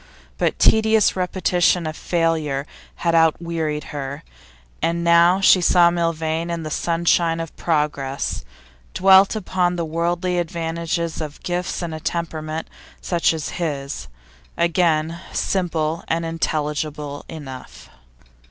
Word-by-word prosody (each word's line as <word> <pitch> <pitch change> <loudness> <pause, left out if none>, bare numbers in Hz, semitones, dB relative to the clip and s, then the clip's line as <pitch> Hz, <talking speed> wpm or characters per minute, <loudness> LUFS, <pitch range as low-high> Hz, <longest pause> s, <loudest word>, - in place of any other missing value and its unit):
But - - +1
tedious 220 -1 +4
repetition 180 -2 +1
of 155 0 -4
failure 160 -5 0 0.4
had 170 - +3
outwearied 165 -2 +1
her, 140 +1 -5 0.6
and 170 +1 0
now 170 +2 +5
she 190 -1 +6
saw 175 0 +5
Milvain 165 -1 -1
in 170 -1 -3
the 155 - -5
sunshine 170 0 +1
of 165 -2 -6
progress, 145 - -1 0.5
dwelt 190 +2 +6
upon 180 -3 0
the 170 -1 -2
worldly 175 +2 -1
advantages 170 -1 -2
of 150 -2 -7
gifts 180 0 -2
and 165 -2 -4
a 155 - -5
temperament 160 -1 -3 0.3
such 170 -2 +1
as 160 -2 -4
his. 140 - -3 0.5
Again, 170 -1 +1
simple 165 -4 -1
and 165 0 -1
intelligible 150 -2 -3
enough. 135 -5 -10
165 Hz, 115 wpm, -21 LUFS, 155-175 Hz, 0.6 s, she